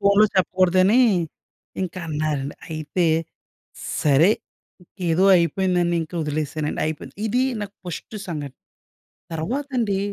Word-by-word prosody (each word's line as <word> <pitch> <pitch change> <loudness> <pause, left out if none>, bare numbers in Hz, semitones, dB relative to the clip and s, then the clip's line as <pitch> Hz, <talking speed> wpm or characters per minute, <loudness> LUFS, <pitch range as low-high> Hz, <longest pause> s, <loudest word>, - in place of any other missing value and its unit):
ఫోన్‌లో 200 +1 +5
చెప్పకూడదని 185 +4 +4 0.8
ఇంకన్నారండి. 155 -5 -3
అయితే, 160 +2 -1 1.0
సరే 150 +5 +5 0.8
ఏదో 165 +3 +3
అయిపోయిందనింక 175 -1 +1
ఒదిలేసానండి. 150 0 -2
అయిపోయింది. 155 -1 -6
ఇదీ 250 +4 +2 0.2
నాకు 205 -1 -6
ఫస్టు 175 +5 -6
సంఘటన. 145 -5 -5 0.8
తర్వాతండీ 230 - -1
175 Hz, 85 wpm, -23 LUFS, 155-195 Hz, 1.0 s, ఫోన్‌లో